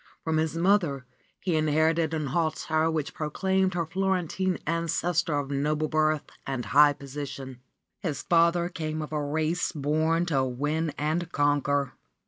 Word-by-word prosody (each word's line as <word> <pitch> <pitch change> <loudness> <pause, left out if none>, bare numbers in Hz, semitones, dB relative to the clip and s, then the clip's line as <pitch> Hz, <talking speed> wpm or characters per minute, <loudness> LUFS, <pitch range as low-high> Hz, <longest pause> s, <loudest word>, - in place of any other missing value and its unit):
From 160 -1 0
his 160 0 0
mother 170 -7 +2 0.4
he 175 -4 0
inherited 155 +1 +2
an 155 -2 -2
hauteur 160 -1 +1
which 155 -3 -2
proclaimed 190 +4 0
his 170 -1 0
Florentine 190 -1 0
ancestor 165 0 0
of 145 -1 -3
noble 150 +2 0
birth 155 -1 +2 0.2
and 130 -4 -3
high 145 +6 +6
position. 135 -2 -7 0.4
His 160 -6 -3
father 170 0 +3
came 155 -3 -4
of 155 - -8
a 150 -1 -1
race 155 +4 0
born 155 +3 +1
to 140 -6 +1
win 145 +6 -1
and 160 +3 -1
conquer. 145 -1 +1
155 Hz, 140 wpm, -27 LUFS, 145-170 Hz, 0.4 s, high